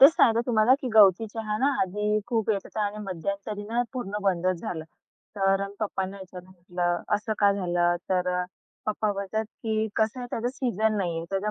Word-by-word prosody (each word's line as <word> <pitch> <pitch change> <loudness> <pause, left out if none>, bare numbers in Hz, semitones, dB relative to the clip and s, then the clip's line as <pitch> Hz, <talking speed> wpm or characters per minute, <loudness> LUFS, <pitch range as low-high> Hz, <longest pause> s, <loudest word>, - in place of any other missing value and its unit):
तेच 275 +3 +11
सांगते 230 -6 +4
तुम्हाला, 230 +1 +5
की 255 - -3
गवती 205 0 +6
चहा 215 -1 -3
ना, 265 - +2 0.2
आधी 210 +3 0
खूप 225 -3 0
येत 200 -2 +1
होता, 220 - -5
आणि 205 +1 -5
मध्यंतरी 200 +3 -4
ना, 230 +3 0
पूर्ण 210 -6 -3
बंदच 185 -2 +1
झालं. 160 -2 -4 0.5
तर 195 0 +2 0.2
पप्पांना 195 -2 -2
ह्याच्यानं 185 -1 -11
म्हटलं, 175 -1 -2
"असं 210 +1 -1
का 200 -1 +5
झालं?" 175 -3 +1
तर 180 -1 +1
अ, - - -1 0.4
पप्पा 215 0 0
बोलतात, 200 +2 -2
की 220 0 -2
कसं 220 +3 +1
आहे, 245 - -4
त्याचा 235 +2 -1
सीझन 220 -5 0
नाहीये, 170 -4 -1
त्याचा 195 +2 -1
205 Hz, 185 wpm, -27 LUFS, 185-220 Hz, 0.5 s, तेच